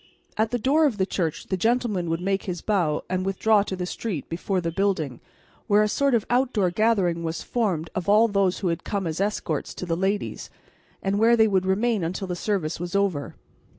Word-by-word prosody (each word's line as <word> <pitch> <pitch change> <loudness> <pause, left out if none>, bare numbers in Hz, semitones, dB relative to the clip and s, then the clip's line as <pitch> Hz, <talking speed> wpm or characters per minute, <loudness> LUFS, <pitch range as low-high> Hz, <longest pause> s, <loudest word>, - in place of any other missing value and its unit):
At 220 +1 +1
the 245 - 0
door 290 +7 +3
of 235 -7 -2
the 190 - +2
church 170 -5 -2
the 190 - +1
gentleman 220 -4 0
would 165 +1 -1
make 195 +1 -1
his 180 -3 -4
bow 175 -8 +1
and 185 0 -1
withdraw 200 +2 +3
to 195 -1 -3
the 180 -1 -3
street 180 - -4
before 185 +3 -1
the 170 -1 -2
building, 165 -8 -1 0.5
where 210 -1 +5
a - - +2
sort 275 +4 +2
of 220 - 0
outdoor 245 -7 +1
gathering 185 -5 +1
was 160 0 -3
formed 185 -9 -1
of 185 0 -3
all 215 +3 +6
those 200 -3 +1
who 185 - +1
had 165 - -2
come 200 -3 -2
as 165 +2 -2
escorts 195 -7 -2
to - - -5
the 165 -1 -1
ladies, 195 +3 -2 0.5
and 195 +1 0
where 230 +2 +5
they 220 -1 +5
would 190 -2 +1
remain 210 +1 +1
until 180 +4 -3
the 180 - -3
service 175 -5 -2
was 175 +2 -5
over. 195 -8 0
195 Hz, 215 wpm, -25 LUFS, 175-215 Hz, 0.5 s, all